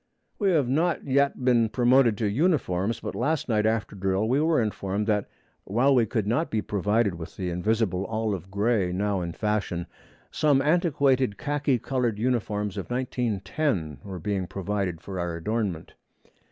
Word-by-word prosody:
We 200 -3 +2
have 155 -8 +2
not 160 +5 +1
yet 140 -1 +1
been 120 -3 +4
promoted 120 -1 +4
to 110 - 0
uniforms, 115 - +1
but - - -4
last 155 -1 -1
night 110 -3 +2
after 110 -2 -1
drill 95 +2 0
we 130 +5 +2
were 160 0 +3
informed 105 -2 -1
that 105 -2 0 0.3
while 125 +8 +2
we 120 -4 +3
could 110 -5 -1
not 120 +10 0
be 110 - 0
provided 105 +1 +1
with 85 0 -9
the 90 -2 -2
invisible 95 +1 0
olive 110 -5 -2
gray 100 -2 +1
now 100 +1 0
in 85 -1 -4
fashion, 105 -5 -1 0.5
some 145 -3 +3
antiquated 140 - +2
khaki 145 -2 0
colored 120 -3 -1
uniforms 105 -4 -1
of - - -5
1910 120 - -1
were 95 -2 -6
being 95 0 -2
provided 95 -3 -3
for 95 -2 -6
our 85 -1 -2
adornment. 100 -2 -3
110 Hz, 160 wpm, -26 LUFS, 95-130 Hz, 0.5 s, been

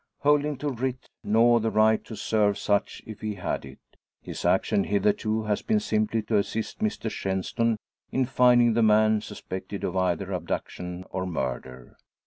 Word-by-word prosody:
Holding 145 -1 +2
no 145 - +1
writ, 130 0 -4
nor 115 +2 +4
the 115 0 0
right 110 0 +3
to 110 - -8
serve 105 -1 +1
such 100 0 -1
if 110 -2 -9
he 110 -1 -3
had 95 - -3
it, 65 0 -11 0.4
his - - -7
action 100 - +2
hitherto 105 +2 +1
has 105 -1 -1
been 220 -1 +1
simply 110 - 0
to 105 0 +1
assist 110 - -2
Mr 215 - -2
Shenstone 110 +3 -1 0.3
in 130 0 +1
finding 120 -2 +4
the 115 - +2
man 110 0 +4
suspected 100 -1 -7
of 90 - -2
either 95 +1 0
abduction 90 0 -4
or 95 0 -3
murder. 65 -6 -5
110 Hz, 160 wpm, -26 LUFS, 95-115 Hz, 0.4 s, nor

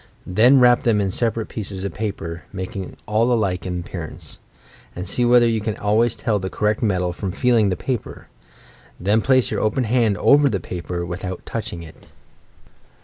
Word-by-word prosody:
Then 120 +9 +5
wrap 120 -1 +5
them 115 -3 +2
in 100 -2 0
separate 115 +1 -1
pieces 95 -3 -5
of 100 - -4
paper 85 -6 -4
(making 95 0 -6
all 110 +3 +1
alike 95 -6 0
in 90 -1 -3
appearance) 85 -2 -8 0.6
and 90 +1 -5
see 120 +6 +1
whether 120 0 +5
you 115 -1 0
can 105 0 -2
al 105 +1 0
ways 120 +1 +2
tell 105 -3 -1
the 95 0 -4
correct 105 +1 -1
metal 90 -5 0
from 95 +1 -4
feeling 115 -1 +2
the 90 - -1
paper. 125 0 -4 0.7
Then 105 +4 +2
place 130 +1 +2
your - - -1
open 110 +4 +1
hand 115 -3 +1
over 145 +4 +5
the 100 -5 -1
paper, 85 0 -5
without 90 +1 -6
touching 85 -7 -5
it. 80 - -15
105 Hz, 180 wpm, -21 LUFS, 90-115 Hz, 0.7 s, Then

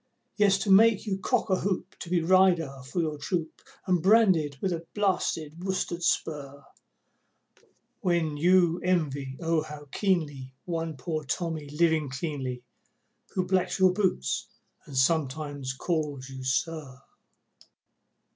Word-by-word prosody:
Yes, 200 -1 +3
it 200 - +2
makes 220 +2 +6
you 195 -3 -2
cock 195 - 0
a 185 - +4
hoop 190 -1 -2
to 170 - -7
be 175 -2 +1
"Rider" 175 -5 +4 0.2
to 180 - -1
your 155 -3 -1
troop, 160 +1 -3 0.2
And 180 -4 +2
branded 185 -8 +4
with 190 -2 -1
a 165 0 -4
blasted 175 -5 -1
worsted 185 -2 -2
spur, 140 -4 -1 1.4
When 170 -4 0
you 175 +2 +4
envy, 145 -7 -1
O 165 -2 +1
how 150 -2 -9
keenly, 145 -10 -1
one 165 -3 -3
poor 155 +4 -3
Tommy 155 0 -3
living 155 -1 +1
cleanly 135 -3 -4 0.7
Who 185 - +1
blacks 185 0 +1
your 185 -1 +5
boots 185 - 0 0.4
and 140 -3 -6
sometimes 145 -1 0
calls 145 -3 -2
you 130 -1 -8
"Sir". 130 0 -2
165 Hz, 130 wpm, -28 LUFS, 145-185 Hz, 1.4 s, makes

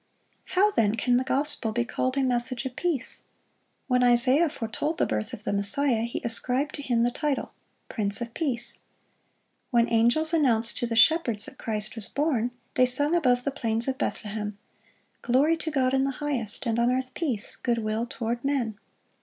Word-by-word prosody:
How, 415 +3 +5
then, 220 - +1
can 245 +2 +1
the 255 - 0
gospel 270 -3 0
be 240 +2 -1
called 255 +2 -2
a 275 - +2
message 250 0 +1
of 255 -1 -5
peace? 330 -8 -2 0.6
When 250 -1 +1
Isaiah 255 +6 +4
foretold 285 +5 -4
the - - +2
birth 105 -1 -3
of 210 - -9
the - - -2
Messiah, 220 +4 +2
he 235 - -5
ascribed 255 +5 0
to 285 - -6
Him 240 -4 0
the 240 - +1
title, 290 +1 -2 0.4
"Prince 200 -3 -3
of 235 -1 -6
Peace." 240 -7 -2 0.9
When 235 -1 +2
angels 240 +8 +4
announced 235 -7 +3
to 240 - -1
the 230 - -3
shepherds 235 -4 +4
that 265 - -11
Christ 215 -1 -2
was 225 -3 -3
born, 275 -5 0 0.2
they 255 0 +3
sung 290 +6 +2
above 250 -7 +2
the 280 - -1
plains 230 -3 +1
of 265 -1 -2
Bethlehem, 210 -1 -4 0.6
"Glory 275 +7 +2
to 320 - -4
God 265 -4 0
in 265 0 +2
the 275 - 0
highest, 265 -7 -3
and 230 -1 0
on 235 +1 +2
earth 255 0 -2
peace, 255 -11 -2
good 240 -2 -1
will 220 +1 -2
toward 235 -1 -4
men." 250 -7 -2
245 Hz, 185 wpm, -26 LUFS, 230-275 Hz, 0.9 s, How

